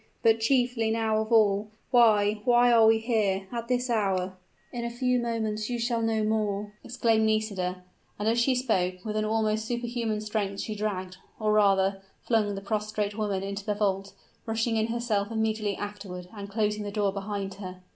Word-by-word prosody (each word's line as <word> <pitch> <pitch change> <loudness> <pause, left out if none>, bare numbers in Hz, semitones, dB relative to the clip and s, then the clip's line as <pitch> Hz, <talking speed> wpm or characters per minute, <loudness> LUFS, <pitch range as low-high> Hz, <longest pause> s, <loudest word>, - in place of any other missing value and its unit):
But, 225 0 +5
chiefly 245 -1 +2
now 220 -1 +1
of 220 +1 -5
all 210 -2 +4 0.2
why, 215 -4 +4
why 245 0 +5
are 225 -2 +6
we 225 0 +6
here 215 -4 0
at 235 -1 -4
this 250 0 0
hour?" 195 -5 0 0.4
"In 240 -1 -3
a 235 - -2
few 250 +1 +1
moments 220 -2 -2
you 245 - -1
shall 235 0 0
know 225 -1 +1
more!" 210 -1 -1
exclaimed 225 -2 +2
Nisida; 195 -4 -1 0.3
and 210 - -2
as 230 +1 +3
she 255 +2 +3
spoke, 185 -7 0
with 215 -1 -3
an 215 0 0
almost 220 0 0
superhuman 235 -2 -2
strength 210 -2 -2
she 215 - -4
dragged, 190 -3 -3 0.2
or 215 -1 +1
rather, 195 -2 +3 0.2
flung 215 -3 +1
the 195 - -5
prostrate 210 0 -2
woman 205 -3 -1
into 200 0 -4
the 210 0 -1
vault, 195 -1 -1 0.3
rushing 225 +1 0
in 220 0 +1
herself 225 -3 -1
immediately 220 -2 -1
afterward, 195 -3 -7
and 200 -1 -7
closing 210 0 0
the 205 - -4
door 200 -1 0
behind 200 -1 -4
her. 185 -1 -8
215 Hz, 180 wpm, -27 LUFS, 200-230 Hz, 0.4 s, are